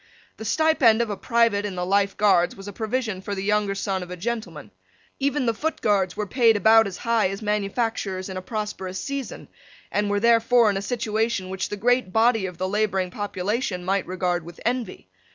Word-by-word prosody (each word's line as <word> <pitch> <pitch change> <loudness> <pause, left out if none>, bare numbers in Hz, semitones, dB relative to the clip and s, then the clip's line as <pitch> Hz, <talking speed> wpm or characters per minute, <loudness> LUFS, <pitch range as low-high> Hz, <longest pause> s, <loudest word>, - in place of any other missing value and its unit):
The 220 - -8
stipend 270 -4 +3
of 220 - -4
a - - -2
private 230 -2 +2
in 205 -2 -4
the 180 0 -2
Life 200 +1 +1
Guards 195 -4 +3
was 195 0 -10
a 205 - -7
provision 220 -2 -2
for 200 +1 -4
the 190 - -4
younger 205 -1 +1
son 195 -1 -2
of 180 - -8
a 180 - -6
gentleman. 230 +4 -5 0.5
Even 280 0 0
the 230 - +2
Foot 315 +8 -3
Guards 195 -3 +1
were 210 - -1
paid 230 0 +3
about 225 +1 +5
as 195 - -7
high 230 -4 +1
as 195 +3 -6
manufacturers 210 -2 -2
in 190 - -6
a 185 - -4
prosperous 190 -2 -5
season, 275 -2 -5 0.4
and 205 0 0
were 205 0 +1
therefore 235 0 +4
in 195 - -2
a - - -2
situation 220 -2 -1
which 190 0 -3
the 205 - -4
great 245 -1 +1
body 225 -1 +3
of 180 -2 -9
the 185 +1 -2
labouring 195 -2 0
population 205 0 -3
might 195 0 0
regard 180 -1 -1
with 170 +1 -12
envy. 245 0 -2
210 Hz, 205 wpm, -24 LUFS, 190-230 Hz, 0.5 s, about